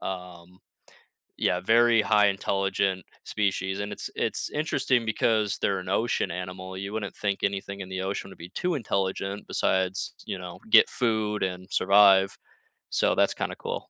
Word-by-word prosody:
um 90 -1 -7 0.8
Yeah, 90 +2 +1
very 115 +3 +4
high 105 -1 +4
intelligent 95 -1 0 0.2
species, 95 -1 -1
and 100 0 -4
it's - - -5
it's - - -1
interesting 130 -5 0
because 110 -1 +1
they're 95 -1 0
an 90 - -8
ocean 105 -1 0
animal, 90 +1 -6
you 100 +2 -5
wouldn't 105 -3 -4
think 100 -2 -2
anything 100 0 -2
in 95 - -8
the 95 0 -4
ocean 95 0 -4
would - - -13
be 85 +2 -10
too 180 - -2
intelligent 100 -4 -2
besides, 95 0 0
you 95 - -4
know, 90 -1 -9
get - - +7
food 110 -3 -1
and 95 0 -4
survive. 100 0 +5 0.5
So - - +2
that's - - +3
kinda - - -3
cool. - - -5
95 Hz, 160 wpm, -26 LUFS, 95-105 Hz, 0.8 s, get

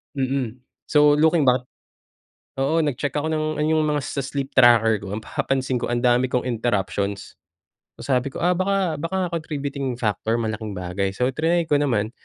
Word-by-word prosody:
Mm, 130 -3 -2 0.3
so 150 -1 +5
looking 160 +1 +4
back 125 -1 +2 1.0
oo, 155 +4 +2
nag-check 145 -1 -2
ako 155 +2 -1
ng 155 -1 0
ano 150 - +1
yung 155 0 +2
mga 150 -1 +1
sa 140 - -3
sleep 135 0 -4
tracker 115 -4 +5
ko - - -9
ang 110 - -7
napapansin 130 -1 -1
ko - - -3
ang 120 +1 -1
dami 125 +1 +3
kong 125 0 -1
interruptions. 105 -4 -2 0.6
So, - - -14
sabi 130 0 -1
ko, - - -6
"Ah, 175 +1 +2
baka 185 -3 0
baka 180 +4 -2
contributing 140 -4 -4
factor 110 -1 -1
malaking 110 -1 -4
bagay" 95 +1 -3
So, 125 +6 0
triny 165 +4 0
ko 145 - +4
naman, 120 -8 0
135 Hz, 175 wpm, -23 LUFS, 120-150 Hz, 1.0 s, so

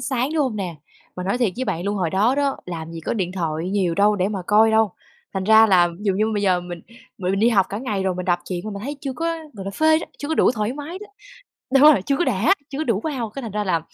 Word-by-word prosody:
sáng, 260 +1 -1
đúng 305 - +2
hông 245 -6 -2
nè? 180 -5 -4 0.4
Mà 180 - -4
nói 200 +6 -1
thiệt 235 -7 +1
với 260 - -2
bạn 170 -4 -3
luôn 205 - -1
hồi 180 -4 -1
đó 210 +8 +2
đó, 280 -1 0
làm 165 -2 -6
gì 165 - -7
có 160 - -3
điện 185 -4 -2
thoại 165 -1 -3
nhiều 190 -4 0
đâu 205 +3 +3
để 185 +1 +1
mà 205 - -3
coi 220 +2 +5
đâu. 220 -2 +3 0.4
Thành 190 - -2
ra 220 +2 +7
là 180 -4 +4
ví 170 - -9
dụ 195 - +2
như 210 +3 +1
bây 205 - -1
giờ 185 -2 +2
mình 175 -1 -8 0.4
m - - -14
mình 195 +2 0
đi 230 - +5
học 195 -5 +3
cả 205 - -4
ngày 210 -6 -2
rồi 190 -1 0
mình 180 0 -4
đọc 175 -1 +2
truyện 180 -2 -3
mà 215 - -4
mình 200 0 -7
thấy 285 +5 -5
chưa 270 -2 -4
có, 325 - -5 0.3
gọi 195 -5 -8
là, 195 - -4
phê 315 +8 +3
đó, - - -7
chưa 290 - -5
có 320 - 0
đủ - - +4
thoải 215 -1 -2
mái 300 +6 -7
đó. 420 - -10 0.7
Đúng 270 - +6
rồi, 195 - 0
chưa 275 - +1
có 350 - +1
đã, 235 - +2 0.2
chưa 275 - -5
có 315 - -1
đủ 220 -5 0
wow. 255 -5 -3
Cái 275 +5 -7
thành 225 - -6
ra 210 0 -1
là 170 -4 +1
205 Hz, 305 wpm, -22 LUFS, 185-255 Hz, 0.7 s, ra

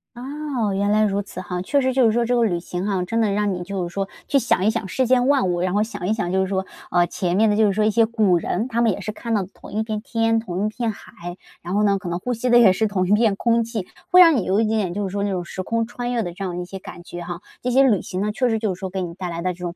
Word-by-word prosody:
哦， 260 -4 -3
原 200 +1 0
来 215 +1 +3
如 200 -1 +1
此 190 -2 -8
哈。 180 -1 -4
确 280 +10 +1
实 260 0 +1
就 255 -1 +4
是 225 - +4
说 235 +1 +1
这 245 +1 +1
个 240 - +3
旅 180 -6 +1
行 180 +2 -5
哈， 190 -3 0
真 230 +5 0
的 215 -2 +2
让 205 0 0
你 180 - -4
就 185 -1 -3
是 170 - -11
说 195 -1 -2 0.2
去 280 - +3
想 230 -6 +1
一 - - +5
想 225 -3 -3
世 260 +7 0
间 250 0 +3
万 275 -7 +3
物， 175 -1 0
然 185 0 0
后 205 +1 +2
想 215 -5 -5
一 210 - +2
想 195 -6 -2
就 190 +1 +2
是 190 - 0
说， 190 0 -1 0.2
啊， 175 0 +3
前 175 +1 -2
面 220 +1 +4
的 205 - +2
就 215 0 +4
是 200 - +1
说 210 +2 +1
一 215 - +3
些 225 +2 +4
古 215 -5 +2
人， 215 +7 -2
他 235 -2 -1
们 230 -2 +4
也 195 - -4
是 205 +2 -4
看 230 +2 -4
到 200 - +1
的 185 - -11
同 - - -13
一 215 +2 -1
片 215 -1 -4
天、 225 -2 +1
同 190 -2 -3
一 - - +1
片 230 +1 -2
海， 175 -3 -10 0.2
然 175 +3 -4
后 210 - +2
呢， 200 -1 +2
可 185 -3 -6
能 175 - -1
呼 245 +8 -3
吸 245 +2 -2
的 240 - +6
也 225 -6 +7
是 220 +4 +1
同 185 -3 0
一 - - -1
片 215 -1 +3
空 230 +2 +2
气， 225 -4 -4 0.2
会 365 -1 +6
让 335 -4 +8
你 230 - +1
有 190 +3 +1
一 225 - +3
点 220 +1 0
点， 185 -4 -1
就 205 +2 -2
是 - - -7
说 200 +1 -2
那 205 - 0
种 180 -2 -2
时 185 - -5
空 230 +4 -1
穿 245 +1 -5
越 235 -2 0
的 175 - -5
这 195 - -7
样 180 -2 -3
一 - - -5
些 190 +2 -8
感 175 -2 -10
觉 175 0 -8
哈， 175 0 -6 0.2
这 250 - -2
些 265 +2 +5
旅 225 -8 +3
行 185 - -5
呢， 210 +1 0
确 245 +4 0
实 225 - +1
就 215 -3 -1
是 180 - -11
说 190 - -4
给 190 0 -3
你 170 -1 -5
带 180 0 -5
来 170 0 -4
的 185 0 0
这 175 - -18
种 175 -1 -5
205 Hz, 370 characters per minute, -22 LUFS, 185-230 Hz, 0.2 s, 让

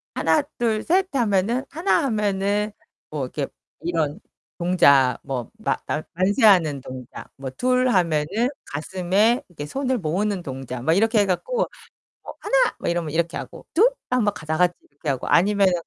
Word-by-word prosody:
"하낫, 160 0 +2
둘, 220 -2 0
셋." 375 +3 +2
하면은 230 +1 +1
"하나." 330 +1 +1
하면은 210 -2 0 0.4
뭐 150 -3 -3
이렇게 140 +2 -4 0.3
이런 160 -4 -1 0.4
동작 140 -8 +4
뭐 130 -4 -4
마 220 - 0
만 155 - -2
만세하는 185 - +4
동작. 130 -1 -9
뭐 135 -1 -6
"둘." 255 - +1
하면은 180 - +1 0.2
가슴에 190 - +1
이렇게 145 -4 -7
손을 260 - -1
모으는 190 +3 -1
동작. 130 -2 -6
막 160 - +3
이렇게 220 +3 +3
해 205 - +4
갖고 480 - -1 0.6
뭐 - - -9
"하나." - - +2
뭐 - - -3
이러면 170 -3 -1
이렇게 170 +2 -1
하고. - - -8
"둘." 450 +9 +6 0.2
하면 220 -5 +2
가 160 - -10
다같이 175 +3 +2 0.2
이렇게 145 +2 -9
하고 135 -2 -1
아니면은 195 0 +4
185 Hz, 310 characters per minute, -23 LUFS, 150-225 Hz, 0.6 s, 둘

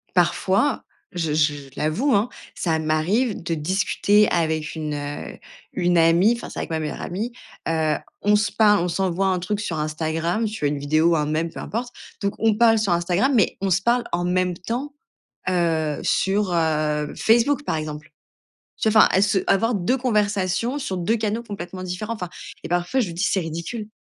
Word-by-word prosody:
parfois 190 +8 +2 0.3
je 165 -4 -1
je 150 -1 +3
je 140 -2 -10
l'avoue 170 - +1
hein, 205 +4 +2 0.3
ça 160 -3 0
m'arrive 175 +10 0
de 170 - -2
discuter 195 +5 +2
avec 160 -3 0
une, 155 -1 -3
heu, 145 0 -6 0.4
une 175 -1 +1
amie, 170 +7 +5
enfin, 235 - -8
c'est - - -10
avec - - -4
ma 160 - 0
meilleure 155 - -4
amie, 210 +7 -3 0.4
heu, 160 -2 +1 0.3
on 210 +1 +4
se 210 0 +1
parle, 210 -3 +4
on - - 0
s'envoie 190 +1 0
un 185 -1 +2
truc 200 +4 -2
sur 175 -6 -3
Instagram, 160 +6 -1
tu 215 0 -4
vois - - +3
une 145 -1 -3
vidéo 155 +4 +2
ou - - +4
un 150 -1 +1
mème, 160 +2 -1
peu - - -9
importe, 240 +3 -4 0.3
donc 200 - 0
on 220 -1 +3
parle 225 -1 +5
sur 205 -4 0
Instagram, 175 +9 +1
mais 215 - +3
on 195 - 0
se 185 +2 +2
parle 240 +1 +2
en 175 +1 0
même 180 0 +1
temps, 250 +10 -4 0.6
heu, 165 -4 0
sur, 195 -1 +1
heu, 155 -2 0
Facebook 240 +6 +3
par 160 - -1
exemple. 150 -1 -6 0.7
Tu 220 - +1
vois 215 0 +6
enfin - - +6
à 190 - +3
ce 200 -1 +2
avoir 225 +4 +2
2 200 +7 +1
conversations 215 +1 0
sur 190 -9 -3
2 185 +6 +1
canaux 220 +2 -2
complètement 185 -4 -7
différents, 185 +5 -4
enfin 180 -5 -6 0.3
et - - -5
parfois 175 +9 0
je 245 - +2
lui 170 - -6
dis: 170 +3 -2
«c'est 195 - +2
ridicule». 170 +7 -5
180 Hz, 195 wpm, -23 LUFS, 160-215 Hz, 0.7 s, vois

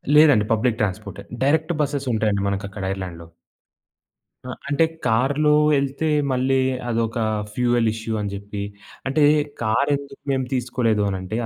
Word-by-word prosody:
లేదండి 145 -8 +6
public 115 +1 0
ట్రాన్స్‌పోర్టే. 105 +1 -3 0.2
Direct 160 +4 +2
buses 140 -2 -2
ఉంటాయండి 105 -2 +1
మనకక్కడ 100 0 -4
ఐర్లాండ్‌లో. 85 -4 -7 1.2
ఆ! - - -6 0.2
అంటే 145 +3 +3 0.2
కారులో 135 +6 +2 0.3
యెళ్తే 140 +3 0 0.2
మళ్ళీ 130 +1 +2 0.3
అదొక 115 -1 -1 0.4
ఫ్యూయల్ 120 -1 +2
ఇష్యూ 110 0 -4
అని 100 -1 -3
చెప్పి, 100 +1 -6 0.5
అంటే 145 +3 +2 0.4
కారెందుకు 140 +5 0
మేము 130 -1 0
తీసుకోలేదు 120 -4 0
అని 95 -1 -1
అంటే 95 +4 -4
120 Hz, 125 wpm, -22 LUFS, 105-140 Hz, 1.2 s, లేదండి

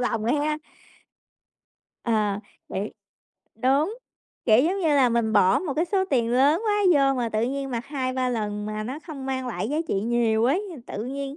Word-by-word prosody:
lòng 230 -3 -1
á 240 - +2
hén. 300 +1 0 1.5
Ờ, 210 -3 +1 0.3
vậy 200 +3 -4 0.6
đúng, 280 - +1 0.5
kiểu, 230 +2 +5
giống 385 +4 0
như 325 - +1
là, 275 -4 +4
mình 230 -2 +1
bỏ 190 -2 +5
một 315 -7 -3
cái 325 +3 +1
số 380 +1 +1
tiền 235 -3 +2
lớn 290 - +4
quá 415 - +2 0.2
vô 275 -1 +4
mà 235 -1 0
tự 215 0 -1
nhiên 270 +2 -2
mặc 235 +1 -3
2-3 260 -2 -1
lần 210 -3 -2
mà 215 0 -3
nó 260 +6 -5
không 275 -5 -7
mang 260 -1 -2
lại 230 -2 -3
giá 295 - -1
trị - - 0
nhiều 225 0 +1
ấy, 295 +11 +2 0.2
tự 210 - -5
nhiên 275 +2 -5
255 Hz, 190 wpm, -25 LUFS, 225-285 Hz, 1.5 s, kiểu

